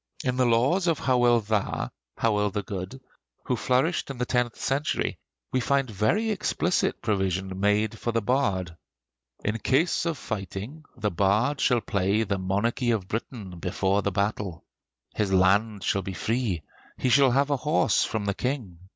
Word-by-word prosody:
In 125 -3 0
the 125 -1 +3
Laws 135 +11 +3
of 165 -3 +2
Howel 120 -3 +3
Dda 105 -1 -1 0.3
(Howel 105 -2 +2
the 100 +1 -3
Good), 95 +7 -6 0.5
who 125 - +1
flourished 130 +10 +1
in 135 - -5
the 125 - -1
tenth 125 -2 0
century, 140 +3 -1 0.3
we 130 - +1
find 135 0 +1
very 145 - +1
explicit 205 - 0
provision 95 -2 -1
made 105 +2 +1
for 120 - -1
the 115 - +1
bard: 100 -8 0 0.7
"In 105 +2 0
case 160 - +1
of 165 -3 -1
fighting, 110 - -6
the 105 -3 -1
Bard 105 - +1
shall 120 -2 +3
play 100 +2 +1
the 100 -2 -2
'Monarchy 105 +6 0
of 110 -5 0
Britain' 105 -4 -5
before 95 +3 0
the 100 - -1
battle! 100 -2 -2 0.5
"His 105 -2 -1
land 100 +2 +3
shall 100 - +1
be 95 +1 -5
free; 110 -3 -1 0.3
he 130 - 0
shall 135 +2 +6
have 140 +3 +2
a 140 - +2
horse 150 -4 +2
from 110 -2 -2
the 100 - 0
King! 120 -8 -3
110 Hz, 165 wpm, -26 LUFS, 100-130 Hz, 0.7 s, shall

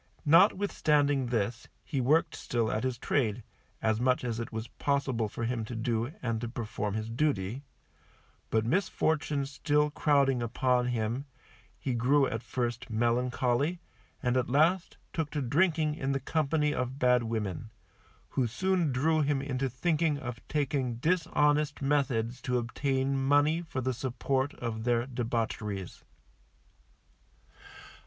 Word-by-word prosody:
Notwithstanding 150 - +4
this 115 0 -2 0.2
he 140 -5 -2
worked 150 +6 +2
still 115 -2 -1
at 110 - -1
his 130 -2 -1
trade, 120 -3 0 0.4
as 110 0 +1
much 125 0 +2
as 120 -2 -2
it 115 - -5
was 110 0 -4
possible 130 -6 -1
for 115 - -5
him 115 -1 -1
to 115 - -6
do, 115 +2 -1
and 115 -2 -1
to 120 - -3
perform 105 -3 -3
his 110 0 -3
duty; 115 -2 -1 0.9
but 110 -1 +1
misfortunes 150 - 0
still 150 +2 +1
crowding 140 -4 +2
upon 125 +1 +1
him, 120 +2 -1 0.5
he 130 - -2
grew 135 +4 +3
at 115 -3 -3
first 120 0 -3
melancholy, 125 +7 +1 0.4
and 125 +1 +2
at 125 - 0
last 165 +7 +2 0.2
took 160 -3 -1
to 150 - -3
drinking 155 +3 +2
in 135 -3 -2
the 135 - 0
company 150 +1 0
of 130 0 -3
bad 125 -2 +4
women, 110 -3 -3 0.6
who 130 -3 0
soon 180 +5 +1
drew 155 +5 +2
him 145 -1 +1
into 135 -1 -2
thinking 155 +3 +1
of 120 -4 -6
taking 135 -4 -1
dishonest 150 0 +1
methods 130 -4 0
to 125 0 0
obtain 130 +3 -1
money 145 +4 +3
for 160 -6 -4
the 130 +1 0
support 130 +2 -1
of 110 -2 -4
their 120 0 +1
debaucheries. 115 -6 -3
130 Hz, 140 wpm, -30 LUFS, 115-145 Hz, 0.9 s, Notwithstanding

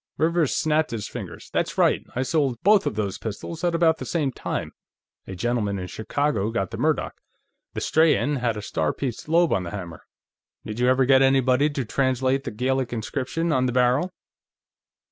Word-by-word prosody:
Rivers 165 -2 +1
snapped 155 0 +1
his 115 -3 -4
fingers. - - -8
"That's - - -1
right! - - +3
I 130 - 0
sold 135 -2 0
both 205 0 +5
of - - -2
those 100 -2 -2
pistols 115 - -6
at 175 -1 +1
about 165 -1 +3
the - - -5
same 150 -6 0
time; - - -4 0.6
a 95 - -6
gentleman 110 -1 -1
in 90 - -4
Chicago 110 +3 -1
got 95 -5 -2
the - - -5
Murdoch. - - -1 0.5
The - - -3
Strahan 150 -2 +3
had 120 -3 -1
a 105 - -6
star 80 -6 -1
pierced 130 +1 -5
lobe 170 +1 +4
on 95 - +1
the 90 - -5
hammer. 85 -4 -8 0.6
Did 110 +1 -6
you 125 - +3
ever 130 +1 +4
get 130 0 +5
anybody 135 +1 +3
to 140 -4 -3
translate 130 +2 0
the - - -2
Gaelic 130 +3 -1
inscription 130 +8 -2
on 130 -3 +2
the - - 0
barrel?" 125 +8 +2
130 Hz, 185 wpm, -24 LUFS, 110-150 Hz, 0.6 s, both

